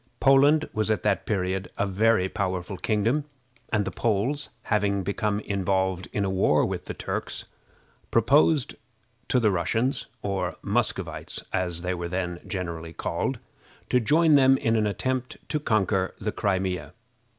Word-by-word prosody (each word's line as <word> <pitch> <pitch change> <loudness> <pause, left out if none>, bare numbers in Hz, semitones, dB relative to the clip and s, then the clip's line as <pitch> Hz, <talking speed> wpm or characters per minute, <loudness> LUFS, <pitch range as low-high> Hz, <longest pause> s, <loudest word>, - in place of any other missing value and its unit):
Poland 145 +3 +5
was 110 0 0
at 105 -4 0
that 105 -2 0
period 95 -2 -1
a 100 - +1
very 100 0 +2
powerful 95 0 -3
kingdom, 115 +9 0 0.5
and 105 -3 +1
the 95 - -3
Poles, 120 +6 0
having 100 -2 +1
become 100 +2 -1
involved 95 -2 -1
in 100 - 0
a - - 0
war 95 -6 +3
with - - -4
the - - -6
Turks, - - -4 0.6
proposed 140 +5 +3 0.5
to 125 - +3
the 110 -3 +3
Russians, 110 +9 0 0.2
or 95 -3 -2
Muscovites, - - -2
as 90 -2 -1
they 90 +1 0
were 85 -1 -4
then 90 -1 -2
generally 85 -4 -4
called, - - -2 0.5
to 125 - +5
join 155 +7 +4
them 135 -1 +6
in 115 -2 +1
an 110 -1 +2
attempt 130 +4 -2
to 150 - 0
conquer 95 -7 +1
the - - -2
Crimea. 95 -2 -1
100 Hz, 150 wpm, -26 LUFS, 95-115 Hz, 0.6 s, them